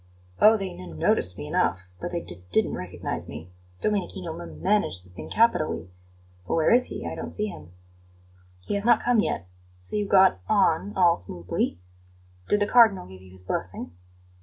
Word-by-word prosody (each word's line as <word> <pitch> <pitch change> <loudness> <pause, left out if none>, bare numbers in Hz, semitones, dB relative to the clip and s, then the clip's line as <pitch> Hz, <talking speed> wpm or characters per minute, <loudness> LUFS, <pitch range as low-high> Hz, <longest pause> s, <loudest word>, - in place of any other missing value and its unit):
"Oh, 220 +1 +7
they 195 -3 -4
n 85 - -10
noticed 90 +3 +1
me 75 - -6
enough, 95 +4 0
but - - -4
they 170 -1 -2
d 90 +1 -5
didn't - - +2
recognize - - -5
me. 80 +5 -9 0.3
Domenichino 190 -4 -2
m 170 +1 -9
managed 190 - +1
the 90 - -19
thing 90 - -9
capitally. 155 - +1 0.6
But - - 0
where 160 -1 +3
is 250 +2 +6
he? - - -6
I - - -4
don't - - -5
see 210 - +1
him." 170 - -11 0.9
"He 90 - -4
has 200 0 -1
not 235 0 +4
come 240 -2 +3
yet. 90 - -1 0.3
So 90 - -6
you 205 -1 0
got 190 -1 +5
on 200 -1 +2
all 175 -2 +5
smoothly? 90 -1 -2 0.7
Did 205 - +3
the - - +4
Cardinal 220 - +5
give 95 0 -13
you 95 - -15
his 95 0 -8
blessing?" 90 - -3
175 Hz, 185 wpm, -26 LUFS, -, 0.9 s, Oh